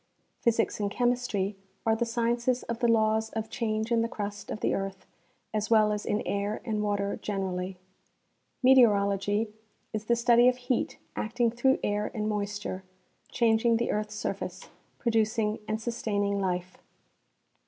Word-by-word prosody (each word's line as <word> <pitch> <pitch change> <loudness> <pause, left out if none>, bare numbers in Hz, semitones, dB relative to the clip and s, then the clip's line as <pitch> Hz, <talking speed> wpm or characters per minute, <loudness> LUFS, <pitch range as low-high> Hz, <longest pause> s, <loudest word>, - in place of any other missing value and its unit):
Physics 230 -2 +1
and 205 -1 0
chemistry 240 -4 0 0.3
are 220 -1 +4
the 235 +1 -1
sciences 240 +2 0
of 235 0 -4
the 240 - +2
laws 220 -1 +3
of 220 0 -4
change 220 -1 -1
in 230 -1 +4
the 230 - +1
crust 205 -2 -5
of - - -4
the - - +1
earth 195 0 -4 0.5
as 210 -1 -1
well 215 -2 +5
as 210 0 -3
in 210 - 0
air 200 +1 -1
and 215 -3 -1
water 205 -1 -1
generall}^ 190 -2 -3 0.9
Meteorology 210 -4 +4 0.4
is 215 -1 -3
the 235 - +3
study 235 +1 +5
of 250 0 +3
heat 250 -1 -1 0.2
acting 235 +1 0
through 265 +3 +3
air 205 0 0
and 215 -1 -1
moisture 205 -2 -3 0.5
changing 230 0 +3
the 235 - 0
earth's 210 0 -2
surface, - - -4 0.3
producing 220 -2 +1
and 215 0 -1
sustaining 205 -3 -1
life. 180 -1 -2
215 Hz, 150 wpm, -28 LUFS, 205-235 Hz, 0.9 s, well